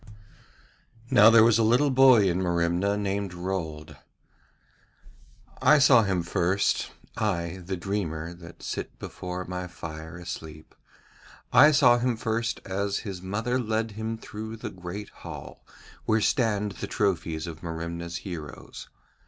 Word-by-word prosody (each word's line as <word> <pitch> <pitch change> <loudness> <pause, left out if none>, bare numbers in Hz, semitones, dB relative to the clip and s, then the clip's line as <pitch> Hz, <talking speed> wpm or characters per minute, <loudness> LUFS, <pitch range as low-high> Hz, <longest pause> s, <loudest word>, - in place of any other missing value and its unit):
Now 105 +2 +8
there 115 -1 +7
was 115 0 +4
a - - +4
little 125 +6 +3
boy 130 -6 +6
in 90 +1 0
Merimna 85 +3 +1
named 100 -2 -2
Rold. 80 -5 -5 1.6
I 150 - +6
saw 130 -4 +6
him 95 -4 0
first, 90 +3 0 0.3
I, 90 -4 -2
the 95 +2 -4
dreamer, 85 -4 -3
that 85 -1 -13
sit - - -5
before 90 0 -6
my 90 0 -5
fire 80 -1 -8
asleep, 80 -3 -8 0.8
I 145 +5 +8
saw 125 -5 +5
him 120 -1 0
first 115 +1 -2
as 100 +1 -1
his 95 -3 -5
mother 110 +7 -1
led 110 -1 -1
him 110 +2 -4
through 110 0 -7
the 110 -1 -6
great 95 +3 -7
hall - - -10 0.4
where 110 0 +3
stand 105 -3 +1
the - - -6
trophies 85 -5 -1
of 80 -2 -8
Merimna's 85 0 -5
heroes. 80 -6 -8
95 Hz, 135 wpm, -27 LUFS, 85-110 Hz, 1.6 s, Now